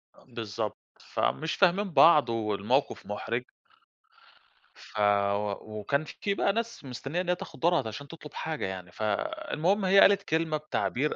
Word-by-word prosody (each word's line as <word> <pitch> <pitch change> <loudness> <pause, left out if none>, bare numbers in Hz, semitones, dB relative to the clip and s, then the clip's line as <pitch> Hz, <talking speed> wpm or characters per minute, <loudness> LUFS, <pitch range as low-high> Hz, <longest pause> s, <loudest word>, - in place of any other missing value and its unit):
أ - - -20
بالضبط. 110 -1 -4 0.2
فمش 160 +3 -1
فاهمين 190 +1 +3
بعض 155 -6 +6
والموقف 110 +3 0
مُحرِج. 115 +4 -3 1.3
ف 105 - -10
و 100 0 +2 0.3
وكان 140 +8 0
في 200 +6 -3
بقى 200 - +1
ناس 230 -8 -4
مستنية 135 +7 -3
إن 180 - -5
هي 180 - +3
تاخُد - - -10
دورها 175 +1 +3
ت - - -7
عشان 140 +6 -7
تطلب 155 -1 -11
حاجة 160 -1 -3
يعني، 95 -2 -6
فالمهم 155 - -1
هي 195 +1 +6
قالت 200 0 +6
كلمة 160 -2 0
بتعبير 150 -1 -1
145 Hz, 150 wpm, -28 LUFS, 105-175 Hz, 1.3 s, بعض